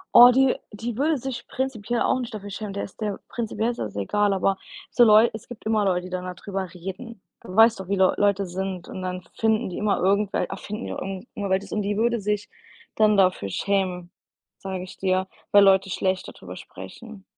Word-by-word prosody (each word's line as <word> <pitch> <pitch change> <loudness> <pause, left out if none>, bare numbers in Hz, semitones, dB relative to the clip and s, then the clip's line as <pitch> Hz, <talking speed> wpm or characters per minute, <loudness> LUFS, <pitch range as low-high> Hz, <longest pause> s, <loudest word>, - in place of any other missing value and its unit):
Oh, 245 +1 +11
die 265 +1 +4 0.2
die 225 +2 -5
würde 300 +3 +2
sich 260 -1 -6
prinzipiell 240 -3 -2
auch - - +2
nicht 240 -2 -5
dafür 205 -1 -6
schämen. 205 0 -5
Der 200 - -3
ist 195 - -10
der 210 -3 -2
prinzipiell 225 -1 -2
ist 240 - -9
das 100 - -5
egal, 200 - +1
aber 195 0 +1 0.3
so 240 - +5
Leu 220 +1 +7
es 220 - -9
gibt 245 - -11
immer 220 -1 +2
Leute, 180 -2 +1
die - - -10
dann 185 0 -4
da 180 - -4
drüber 195 +1 -5
reden. 190 +5 -8 0.2
Du 185 - -10
weißt 225 0 +6
doch, 190 - -7
wie 200 - 0
Leu 190 -1 +4
Leute 200 -1 +2
sind 185 0 -5
und 185 - -6
dann 180 0 -4
finden 220 -3 +1
die 180 - -6
immer 210 -1 +1
irgendwel 200 +1 +2
erfinden 210 +3 -6
die - - -4
auch - - -5
irgend 195 +3 -6
immer 200 -1 -4
welches 190 +1 0
und 215 - 0
die 205 +1 -1
würde 235 +2 +1
sich 210 0 -2 0.5
dann 215 -1 +4
dafür 185 - +3
schämen, 180 - -1 0.5
sage 190 -1 -5
ich 185 - -11
dir, 185 0 0 0.3
weil 205 0 +8
Leute 195 -1 +5
schlecht 185 0 -1
da - - -9
drüber - - -10
sprechen. 220 -5 -11
200 Hz, 220 wpm, -24 LUFS, 190-225 Hz, 0.5 s, Oh